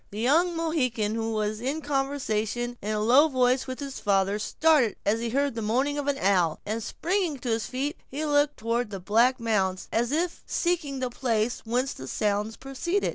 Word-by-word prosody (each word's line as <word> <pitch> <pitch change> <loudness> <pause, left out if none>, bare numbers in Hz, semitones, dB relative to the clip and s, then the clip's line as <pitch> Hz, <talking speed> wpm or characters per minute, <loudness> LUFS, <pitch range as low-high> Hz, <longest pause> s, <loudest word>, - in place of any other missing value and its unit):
The 205 - -9
young 330 +9 +3
Mohican, 255 -10 0
who 225 0 -2
was 215 0 -1 0.2
conversing 245 -4 -1
in 205 - -4
a 215 - 0
low 250 +8 +6
voice 255 -2 +2
with 260 0 -5
his 275 -2 -6
father, 200 0 +1
started 295 -1 +3
as 215 +3 +2
he 230 0 -2
heard 280 +3 +1
the 225 - -4
moaning 265 +7 0
of 285 - -4
an 285 -1 +1
owl, 185 - +2
and, 220 +2 -2
springing 360 - -1
on 240 - 0
his 225 0 -1
feet, 280 +5 -3
he 295 +4 -4
looked 290 0 +2
toward 230 +1 -1
the 195 -2 -6
black 230 +7 +3
mounds, 195 -5 0
as 235 +2 +1
if 335 +3 -1
seeking 315 -6 -1
the 255 -1 -1
place 235 -2 -1
whence 250 +4 0
the 130 - -9
sounds 210 +6 -1
proceeded. 305 +9 -1
245 Hz, 190 wpm, -27 LUFS, 215-285 Hz, 0.2 s, low